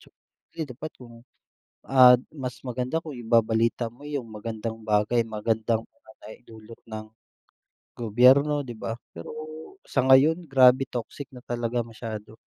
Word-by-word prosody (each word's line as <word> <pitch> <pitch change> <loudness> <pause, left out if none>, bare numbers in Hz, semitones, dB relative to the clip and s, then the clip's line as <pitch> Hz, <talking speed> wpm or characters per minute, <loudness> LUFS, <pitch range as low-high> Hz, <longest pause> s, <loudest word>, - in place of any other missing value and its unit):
siyempre, - - -17
dapat 155 +5 -7
kung, 120 -2 -13 0.7
ah, 130 -2 +8 0.2
mas 125 -3 -6
maganda 125 +6 -2
kung 150 -4 -8
ibabalita 115 0 +1
mo 140 +4 -17
yung 140 -6 -4
magandang 110 +1 -5
bagay 105 +2 +2
magandang 110 +1 -1
bagay 110 +1 -15
dulot 110 0 -13
ng 110 0 -7 0.9
gobyerno 130 +6 +4
'di 120 -3 -8
ba? 115 - -4 0.2
Pero 85 - -9 0.6
sa 135 - 0
ngayon, 155 +6 +5
grabe 130 -1 +5
toxic 125 +3 -6
na 125 -1 -12
talaga 120 0 -2
masyado. 110 -1 -8
120 Hz, 130 wpm, -26 LUFS, 110-130 Hz, 0.9 s, ah